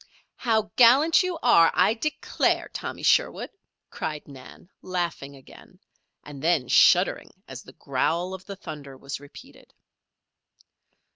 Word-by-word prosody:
"How 220 Hz, -3 st, -1 dB
gallant 270 Hz, +7 st, +5 dB
you 365 Hz, -2 st, -3 dB
are, 165 Hz, 0 st, +5 dB
I 185 Hz, +4 st, +3 dB
declare, 295 Hz, +7 st, -1 dB
Tommy -, -, -7 dB
Sherwood," -, -, +1 dB, 0.4 s
cried 150 Hz, -1 st, -6 dB
Nan, 135 Hz, +3 st, -14 dB
laughing 170 Hz, -6 st, -4 dB
again, 135 Hz, -, -17 dB, 0.5 s
and 145 Hz, -2 st, -11 dB
then 160 Hz, -6 st, +1 dB
shuddering -, -, +3 dB, 0.2 s
as -, -, -9 dB
the -, -, -16 dB
growl 175 Hz, +3 st, -2 dB
of 190 Hz, 0 st, -9 dB
the 200 Hz, -, -7 dB
thunder 140 Hz, -7 st, -10 dB
was 140 Hz, +1 st, -7 dB
repeated. 145 Hz, 0 st, -16 dB
175 Hz, 125 wpm, -25 LUFS, 140-220 Hz, 0.5 s, gallant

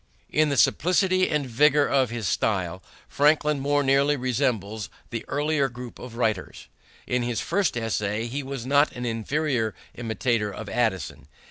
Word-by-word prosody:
In 155 Hz, 0 st, +3 dB
the 140 Hz, -, 0 dB
simplicity 185 Hz, +2 st, +3 dB
and 150 Hz, -2 st, 0 dB
vigor 145 Hz, +4 st, +3 dB
of 135 Hz, -4 st, +2 dB
his 115 Hz, -4 st, -3 dB
style 95 Hz, -3 st, -1 dB, 0.3 s
Franklin 150 Hz, 0 st, +2 dB
more 145 Hz, +1 st, +1 dB
nearly 140 Hz, +2 st, +3 dB
resembles 110 Hz, -5 st, -1 dB, 0.2 s
the 115 Hz, -2 st, -4 dB
earlier 145 Hz, -1 st, +1 dB
group 120 Hz, 0 st, -9 dB
of 125 Hz, -2 st, -9 dB
writers. 110 Hz, -5 st, -2 dB, 0.4 s
In 125 Hz, 0 st, 0 dB
his 120 Hz, -2 st, -1 dB
first 195 Hz, -10 st, 0 dB
essays 115 Hz, 0 st, -2 dB
he 140 Hz, +3 st, -2 dB
was 135 Hz, -3 st, -6 dB
not 145 Hz, +3 st, +3 dB
an 125 Hz, 0 st, -5 dB
inferior 120 Hz, 0 st, -1 dB, 0.2 s
imitator 115 Hz, -2 st, -1 dB
of 105 Hz, 0 st, -7 dB
Addison. 95 Hz, -, -1 dB
125 Hz, 150 wpm, -25 LUFS, 110-145 Hz, 0.4 s, In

